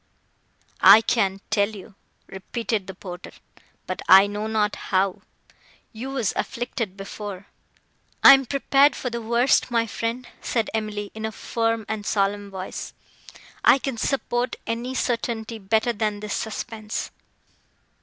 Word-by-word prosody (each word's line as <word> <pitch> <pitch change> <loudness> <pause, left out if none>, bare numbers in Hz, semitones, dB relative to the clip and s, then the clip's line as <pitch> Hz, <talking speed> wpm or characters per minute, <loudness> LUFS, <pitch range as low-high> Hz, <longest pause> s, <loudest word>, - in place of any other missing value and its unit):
"I 200 +4 +9
can 195 -4 0
tell 200 -1 +2
you," 205 -1 -11 0.3
repeated 210 +1 -4
the 190 - -7
porter,—"but 180 -1 -10
I 190 +1 +9
know 205 +1 -4
not 215 -2 0
how—you 195 +5 -5
were 270 -3 -3
afflicted 230 -5 -3
before.—" 195 -1 -7 0.8
"I 275 - +12
am 270 -2 +3
prepared 275 +2 +3
for 250 - -4
the 235 0 -4
worst, 235 +4 +2
my 230 -1 +1
friend," 230 +3 -4
said 230 -3 -1
Emily, 210 -2 -3
in 220 - -7
a 220 - -2
firm 225 0 -2
and 220 -1 -3
solemn 200 0 0
voice. 190 -1 -7 0.7
"I - - +7
can 270 -3 -4
support 245 -1 -1
any 235 +3 -3
certainty 230 -2 -2
better 220 +4 +1
than 210 -1 -2
this 210 0 -5
suspense." 220 0 -4
220 Hz, 130 wpm, -24 LUFS, 205-235 Hz, 0.8 s, I